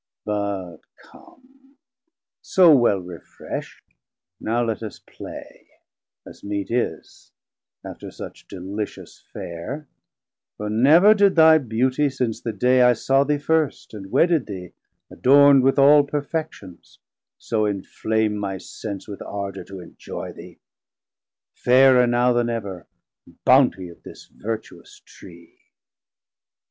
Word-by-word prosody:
But 100 Hz, -5 st, -4 dB, 0.2 s
come, 270 Hz, +1 st, -21 dB, 0.6 s
so 175 Hz, -5 st, +5 dB
well 120 Hz, -6 st, +3 dB
refresh't, 90 Hz, -2 st, -9 dB, 0.6 s
now 120 Hz, +2 st, -1 dB
let 115 Hz, -2 st, -3 dB
us 110 Hz, -2 st, -7 dB
play, -, -, -12 dB, 0.6 s
As -, -, -14 dB
meet 100 Hz, 0 st, -4 dB
is, 120 Hz, 0 st, -4 dB, 0.5 s
after -, -, -9 dB
such -, -, -11 dB
delicious 100 Hz, +3 st, -7 dB
Fare; 130 Hz, -, -7 dB, 0.7 s
For 105 Hz, 0 st, -4 dB
never 155 Hz, -, +6 dB
did 200 Hz, -2 st, +3 dB
thy 160 Hz, -1 st, +7 dB
Beautie 130 Hz, +3 st, 0 dB
since 125 Hz, -4 st, -3 dB
the 115 Hz, -, -3 dB
day 125 Hz, +4 st, +2 dB
I 125 Hz, 0 st, +6 dB
saw 135 Hz, +4 st, +1 dB
thee 150 Hz, +1 st, 0 dB
first 155 Hz, -2 st, -1 dB
and 95 Hz, -2 st, -9 dB
wedded 165 Hz, -5 st, +2 dB
thee, 90 Hz, -4 st, -8 dB, 0.4 s
adorn'd 140 Hz, +1 st, +5 dB
1030 -, -, -3 dB
With 135 Hz, -, +2 dB
all 145 Hz, +1 st, +6 dB
perfections, 145 Hz, -, -6 dB, 0.4 s
so 110 Hz, -2 st, -1 dB
enflame 105 Hz, +2 st, -2 dB
my 100 Hz, -2 st, -4 dB
sense 100 Hz, +1 st, -8 dB
With 100 Hz, -2 st, -9 dB
ardor 100 Hz, -1 st, -6 dB
to 95 Hz, -2 st, -10 dB
enjoy 85 Hz, -, -9 dB
thee, -, -, -13 dB, 1.0 s
fairer 125 Hz, 0 st, +4 dB
now 120 Hz, +1 st, +2 dB
Then 120 Hz, 0 st, 0 dB
ever, 100 Hz, -6 st, -5 dB, 0.6 s
bountie 90 Hz, -2 st, +3 dB
of 85 Hz, -, -18 dB
this -, -, -13 dB
vertuous 110 Hz, +1 st, -8 dB
Tree. 85 Hz, -2 st, -16 dB
120 Hz, 120 wpm, -22 LUFS, 100-140 Hz, 1.0 s, thy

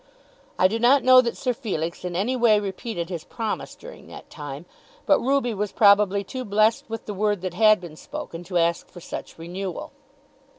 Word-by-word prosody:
I 185 Hz, -, +5 dB
do 225 Hz, +4 st, -3 dB
not 255 Hz, +4 st, +4 dB
know 255 Hz, 0 st, +8 dB
that 235 Hz, -2 st, -3 dB
Sir 250 Hz, -2 st, -1 dB
Felix 180 Hz, -, -4 dB
in 180 Hz, -1 st, -4 dB
any 215 Hz, +8 st, 0 dB
way 230 Hz, -4 st, +4 dB
repeated 195 Hz, -2 st, -5 dB
his 170 Hz, -4 st, -5 dB
promise 220 Hz, +3 st, -5 dB
during -, -, -13 dB
that -, -, -12 dB
time, 145 Hz, +1 st, -8 dB, 0.4 s
but -, -, +4 dB
Ruby 265 Hz, -2 st, +1 dB
was 210 Hz, 0 st, -3 dB
probably 200 Hz, -1 st, +4 dB
too 255 Hz, +6 st, -6 dB
blessed 215 Hz, +1 st, +2 dB
with 225 Hz, 0 st, -6 dB
the 210 Hz, -, -5 dB
word 205 Hz, -1 st, 0 dB
that 185 Hz, -2 st, -4 dB
had 215 Hz, +2 st, +5 dB
been 170 Hz, -4 st, -10 dB
spoken 165 Hz, +2 st, -8 dB
to 180 Hz, 0 st, -2 dB
ask 170 Hz, 0 st, 0 dB
for 175 Hz, -, -12 dB
such -, -, -8 dB
renewal. 180 Hz, +2 st, -6 dB
205 Hz, 195 wpm, -24 LUFS, 175-230 Hz, 0.4 s, know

